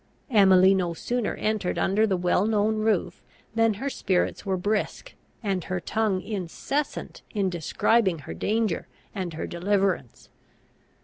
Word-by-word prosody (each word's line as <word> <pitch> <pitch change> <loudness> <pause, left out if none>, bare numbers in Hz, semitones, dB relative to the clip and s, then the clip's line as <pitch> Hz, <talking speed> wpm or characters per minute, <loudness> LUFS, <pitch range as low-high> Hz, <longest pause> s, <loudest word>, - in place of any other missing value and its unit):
Emily 190 -3 +6
no 175 -3 0
sooner 245 +5 -2
entered 215 -4 -1
under 210 +3 +2
the 190 -3 +1
well 180 +3 +2
known 215 0 +2
roof 215 -4 0 0.3
than 225 -1 +3
her 270 +8 -4
spirits 190 -9 0
were 190 -2 -1
brisk, 210 - -2 0.3
and 195 -4 -1
her 185 -2 -2
tongue 210 0 0
incessant 215 - -3
in 195 -3 +1
describing 185 +3 +2
her - - -6
danger 215 - -1 0.3
and 185 -5 -4
her - - -3
deliverance. 190 - -1
195 Hz, 135 wpm, -26 LUFS, 180-220 Hz, 0.3 s, Emily